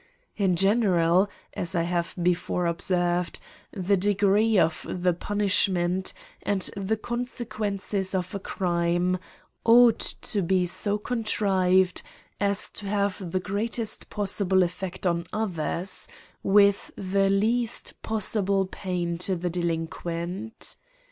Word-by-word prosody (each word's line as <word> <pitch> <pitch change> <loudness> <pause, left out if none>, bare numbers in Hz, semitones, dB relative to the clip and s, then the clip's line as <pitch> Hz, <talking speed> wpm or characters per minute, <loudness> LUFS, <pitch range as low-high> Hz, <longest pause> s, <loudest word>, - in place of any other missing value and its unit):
In 190 -3 +2
general, 195 -2 +3 0.2
as 180 +2 -1
I 170 - +2
have 170 0 -2
be 175 +1 +4
fore 175 0 -2
observed, 175 0 +1 0.3
The 195 0 +1
degree 205 +2 +3
of 165 -3 +2
the 180 0 +1
punishments, 190 -1 0 0.3
and 200 -2 +1
the 200 +2 -1
consequences 215 -5 -3
of 185 -1 -2
a 200 - -3
crime 175 -1 0
^ - - -19 0.4
ought 235 0 +6
to 200 -3 -2
he 185 -1 +3
so 205 +4 0
contri 195 -5 +2
ved 180 - -5 0.4
as 200 0 +1
to 205 - -6
have 200 -3 -1
the 185 - +1
greatest 215 +4 -2
possible 195 -2 +2
effect 185 +1 -4
on 170 -1 +1
others^ 185 -2 -2 0.3
with 200 0 +4
the 195 0 +1
least 225 +4 +1
possible 200 -3 +1
pain 175 -3 -3
to 185 +1 0
the 175 0 -2
delinquent. 170 +4 -4
190 Hz, 120 wpm, -26 LUFS, 175-205 Hz, 0.4 s, ought